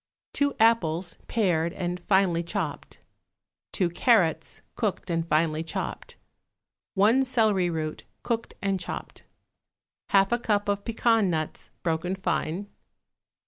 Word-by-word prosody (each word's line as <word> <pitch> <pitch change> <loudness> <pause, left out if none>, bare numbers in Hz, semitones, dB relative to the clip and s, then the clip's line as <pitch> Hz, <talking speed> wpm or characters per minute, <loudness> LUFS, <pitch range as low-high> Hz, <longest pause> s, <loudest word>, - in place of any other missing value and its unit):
2 285 0 +1
apples, 180 -7 +2
pared 170 -7 +1
and 180 -2 -3
finely 185 -2 +2
chopped. 170 - -5 0.7
2 185 - +2
carrots, 175 - +2
cooked 195 -4 -2
and 165 0 -1
finely 155 0 +1
chopped. 165 - -5 0.8
1 220 +7 +5
celery 215 -8 +2
root, 155 -2 -3 0.2
cooked 230 -1 -2
and 195 -1 +1
chopped. 170 - -7 0.8
1/2 195 +1 +4
a 240 - +2
cup 205 -3 0
of 200 0 0
pecan 225 -3 +2
nuts, 155 -2 -3
broken 175 +2 -1
fine. 185 0 -2
190 Hz, 115 wpm, -27 LUFS, 165-220 Hz, 0.8 s, 1